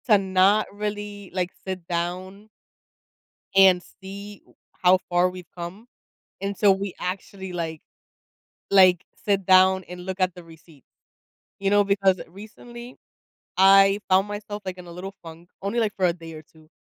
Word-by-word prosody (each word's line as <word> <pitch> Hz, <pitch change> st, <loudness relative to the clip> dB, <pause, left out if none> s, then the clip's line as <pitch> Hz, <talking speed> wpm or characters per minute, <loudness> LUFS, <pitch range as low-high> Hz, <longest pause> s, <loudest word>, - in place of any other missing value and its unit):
To 210 Hz, -, +7 dB
not 195 Hz, +2 st, +3 dB
really, 205 Hz, -1 st, -5 dB
like, 180 Hz, 0 st, -2 dB
sit 185 Hz, -2 st, -6 dB
down 185 Hz, +4 st, -4 dB, 1.1 s
and 190 Hz, -2 st, +6 dB, 0.2 s
see 200 Hz, +1 st, -9 dB
w -, -, -26 dB, 0.3 s
how 185 Hz, +1 st, +6 dB
far 175 Hz, +1 st, +3 dB
we've 180 Hz, -1 st, -11 dB
come. 175 Hz, +6 st, -7 dB, 0.6 s
And 200 Hz, 0 st, -3 dB
so, 200 Hz, 0 st, +5 dB
we 195 Hz, -1 st, -4 dB
actually, 190 Hz, +1 st, -5 dB
like 165 Hz, -3 st, -4 dB, 0.9 s
like, 185 Hz, -3 st, +5 dB, 0.2 s
sit 195 Hz, -2 st, +1 dB
down 190 Hz, 0 st, +5 dB
and 180 Hz, 0 st, -9 dB
look 190 Hz, 0 st, -5 dB
at 185 Hz, -1 st, +1 dB
the 180 Hz, -, -11 dB
receipt. 160 Hz, -4 st, -18 dB, 0.8 s
You 195 Hz, 0 st, 0 dB
know, 205 Hz, 0 st, +4 dB
because, 195 Hz, -2 st, +2 dB
recently, 240 Hz, +6 st, -12 dB, 0.6 s
I 195 Hz, +1 st, +6 dB
found 190 Hz, +2 st, +4 dB
myself, 205 Hz, 0 st, -6 dB
like, 185 Hz, -1 st, -5 dB
in 180 Hz, -, -11 dB
a -, -, -10 dB
little 185 Hz, +3 st, -8 dB
funk, 165 Hz, +1 st, -12 dB
only 200 Hz, +5 st, -1 dB
like 215 Hz, -3 st, -1 dB
for 190 Hz, -, +1 dB
a 175 Hz, -, +2 dB
day 165 Hz, -1 st, -11 dB
or 155 Hz, 0 st, -10 dB
2, 155 Hz, 0 st, -23 dB
190 Hz, 160 wpm, -24 LUFS, 180-200 Hz, 1.1 s, To